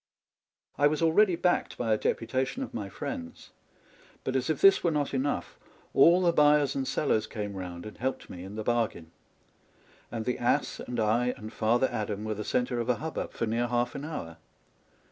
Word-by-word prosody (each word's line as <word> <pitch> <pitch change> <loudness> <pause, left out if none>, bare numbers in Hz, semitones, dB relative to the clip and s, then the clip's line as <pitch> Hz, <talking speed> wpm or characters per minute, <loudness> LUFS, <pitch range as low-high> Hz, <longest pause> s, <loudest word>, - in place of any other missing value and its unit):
I 145 - +6
was 155 +2 0
already 175 +3 +4
backed 175 +1 0
by 115 -3 +1
a - - +2
deputation 130 - -1
of - - -8
my 100 -3 -4
friends; 85 -3 -7 0.7
but 130 - -2
as 130 +1 0
if 155 - 0
this 195 0 +6
were 170 - +3
not 150 -3 -1
enough, 135 +2 -2 0.3
all 170 +6 +6
the 175 -2 +3
buyers 150 -2 +4
and 135 -1 -2
sellers 110 -7 +1
came 105 -3 -5
round 90 -2 -7
and 105 - -10
helped 130 +1 -2
me 90 - -8
in 95 +2 -8
the 110 - -4
bargain; 110 -8 -1 1.0
and 115 -1 -4
the 125 - -1
ass 120 - +1
and 120 -1 -4
I 120 +3 +2
and 110 -1 -9
Father 120 +4 +2
Adam 105 -1 -3
were 110 0 -2
the 105 0 -5
centre 125 +2 0
of 120 +1 -2
a 125 - +4
hubbub 160 +5 -4
for - - -1
near 115 +2 0
half 120 0 0
an 140 - -6
hour. 85 - -6
120 Hz, 195 wpm, -29 LUFS, 110-145 Hz, 1.0 s, I